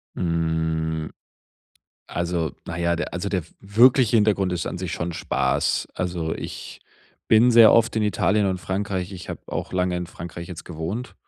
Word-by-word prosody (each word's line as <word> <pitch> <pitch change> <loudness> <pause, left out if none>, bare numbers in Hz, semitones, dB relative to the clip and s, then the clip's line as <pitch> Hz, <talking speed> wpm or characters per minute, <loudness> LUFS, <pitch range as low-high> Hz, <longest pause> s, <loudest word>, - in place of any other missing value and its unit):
Hm, 80 -2 -1 1.0
also, 85 -2 -2
na 85 - -6
ja, 85 0 +1
der 85 - -4
also, 90 +3 -2
der 95 -5 -1
w - - -21
wirkliche 115 +4 +5
Hintergrund 100 -4 +2
ist 90 - -2
an - - -4
sich 90 -1 -4
schon 85 0 -3
Spaß. 85 - 0
Also 85 -3 -2
ich - - -8 0.5
bin 115 +3 +6
sehr 115 -2 +8
oft 115 0 +3
in 110 - +2
Italien 105 0 +2
und 95 -1 -1
Frankreich. 95 0 -3
Ich 90 -2 -9
habe - - -6
auch - - -5
lange 90 -1 0
in 90 0 -3
Frankreich 85 0 -8
jetzt 90 -3 -8
gewohnt. 90 +9 -5
90 Hz, 170 wpm, -23 LUFS, 85-105 Hz, 1.0 s, sehr